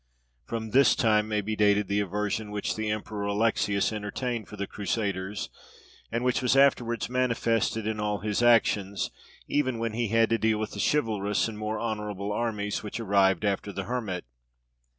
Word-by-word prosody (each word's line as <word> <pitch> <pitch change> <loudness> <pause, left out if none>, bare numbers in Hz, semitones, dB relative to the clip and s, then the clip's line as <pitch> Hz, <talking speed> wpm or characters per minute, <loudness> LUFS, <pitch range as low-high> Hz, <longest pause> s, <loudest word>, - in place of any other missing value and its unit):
From 110 -1 -4
this 135 +4 +5
time 110 -2 +3
may 105 -1 0
be 110 +2 -3
dated 105 -1 +3
the 100 +1 +1
aversion 105 +2 -2
which 105 -1 -2
the 110 -1 -2
Emperor 105 -1 -3
Alexius 100 0 +1
entertained 110 +2 -3
for - - -10
the 100 - -2
Crusaders, 100 -2 -3 0.6
and 115 +1 -1
which 125 0 +1
was 125 +1 +2
afterwards 120 -4 +3
manifested 115 -3 0
in 110 0 -2
all 105 0 0
his 105 +2 -1
actions, 105 -4 +3 0.4
even 130 -4 0
when 115 -1 -2
he 120 0 0
had 115 +1 +3
to 115 - +2
deal 110 -1 +2
with 110 0 -3
the - - -7
chivalrous 105 -9 +1
and 110 -2 -7
more 110 0 -2
honourable 105 -3 -3
armies 105 -3 -2
which 105 +2 -5
arrived 100 -3 +3
after 100 0 -1
the 100 0 -4
Hermit. 105 -5 -3
105 Hz, 170 wpm, -27 LUFS, 100-115 Hz, 0.6 s, this